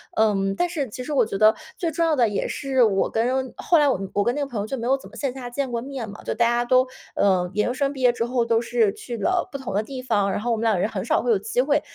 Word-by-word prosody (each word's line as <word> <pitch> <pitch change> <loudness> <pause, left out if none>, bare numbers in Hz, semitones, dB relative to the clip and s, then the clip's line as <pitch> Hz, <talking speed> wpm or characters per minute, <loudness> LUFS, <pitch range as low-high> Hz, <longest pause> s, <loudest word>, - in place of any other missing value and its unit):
嗯， 195 -3 +2
但 350 - 0
是 300 -6 -2
其 250 +4 -7
实 300 - -6
我 275 - +3
觉 195 - -4
得 215 +1 +6 0.2
最 335 -2 -1
重 335 +2 +1
要 320 -2 +2
的 240 -5 +3
也 205 - -2
是 265 -3 +1
我 195 -4 +2
跟 255 +3 0
后 345 - +3
来 295 -1 +4
我 195 -3 -1
跟 240 - +1
那 290 - -3
个 285 - -1
朋 230 -6 -3
友 - - -3
就 265 +5 -4
没 235 0 -3
有 270 - +4
怎 275 - -10
么 - - -14
线 275 -3 -2
下 255 -2 -7
见 270 +2 -2
过 235 - -1
面 260 -3 -6
嘛， 205 - -11
就 - - -2
大 235 - +2
家 240 0 +1
都， 255 +1 +3 0.3
呃， 185 -3 +2
研 210 +1 +1
究 245 - -1
生 275 +1 0
毕 275 - -9
业 250 -1 +4
之 230 - -2
后 240 -1 0
都 230 0 +2
是 230 -4 +1
去 240 -2 -7
了 360 +7 +1
不 275 - -4
同 265 -7 -6
的 205 - +2
地 260 +3 -7
方， 205 -5 +1
然 - - -1
后 240 +3 -2
我 230 - +1
们 220 - -4
两 220 -5 +2
人 205 - +1
很 190 -4 -4
少 - - +2
会 245 - +2
有 215 - +4
机 245 +5 0
会 290 +2 +2
240 Hz, 340 characters per minute, -23 LUFS, 215-270 Hz, 0.3 s, 得